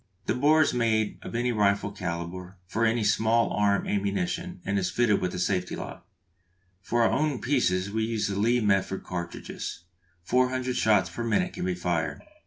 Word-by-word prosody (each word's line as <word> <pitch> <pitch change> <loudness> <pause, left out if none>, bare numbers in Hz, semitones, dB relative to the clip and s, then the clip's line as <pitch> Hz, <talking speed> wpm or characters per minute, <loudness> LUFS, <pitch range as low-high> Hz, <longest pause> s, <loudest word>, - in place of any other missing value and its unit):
The - - +1
bore 155 +4 +4
is - - 0
made 110 -3 +1
of - - -7
any 120 +1 +1
rifle 100 -2 +1
calibre 90 -1 -5
for 110 +5 0
any 115 0 +1
small 110 +2 +2
arm 100 -1 +2
ammunition, 175 - -2
and 100 0 +1
is 90 -1 -1
fitted 120 -4 +2
with 90 - -1
a - - -3
safety 90 0 -1
lock. - - -8 0.7
For 120 +4 +1
our - - +3
own 150 -3 0
pieces 100 -7 +1
we 110 +1 0
use 110 -1 -1
the 100 - -3
Lee 120 +5 +2
Metford 95 -2 +1
cartridges. 85 -1 -6 0.4
Four 125 +7 +2
hundred 130 -1 -2
shots 105 -4 +3
per 120 - -4
minute 180 +11 0
can - - -4
be 90 -1 0
fired. 85 -2 -2
105 Hz, 185 wpm, -27 LUFS, 95-120 Hz, 0.7 s, bore